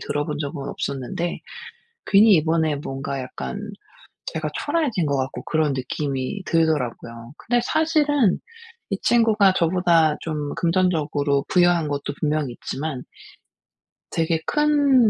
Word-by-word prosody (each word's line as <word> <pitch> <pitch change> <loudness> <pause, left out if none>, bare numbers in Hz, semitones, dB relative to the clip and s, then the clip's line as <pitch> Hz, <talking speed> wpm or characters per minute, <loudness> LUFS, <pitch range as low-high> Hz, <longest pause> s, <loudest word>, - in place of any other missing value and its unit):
들어본 145 0 -2
적은 140 -1 -4
없었는데 140 +6 -3 0.7
괜히 205 +1 +6
이번에 160 -2 +2
뭔가 135 -1 -4
약간 130 +10 -6 0.7
제가 - - -3 0.2
초라해진 270 - 0
것 140 -1 0
같고 130 0 -3
그런 155 -2 +1
느낌이 135 +6 -3
들더라고요. 125 -7 -1
근데 240 +1 +1
사실은 295 - +2 0.5
이 195 - -1
친구가 220 -4 +4
저보다 170 -3 +3
좀 150 -3 -4
금전적으로 155 -5 +1
부유한 175 -3 +3
것도 145 0 -3
분명 150 -2 0
있지만 135 +2 -5 1.1
되게 165 0 0
큰 285 -5 +4
160 Hz, 270 characters per minute, -23 LUFS, 140-195 Hz, 1.1 s, 괜히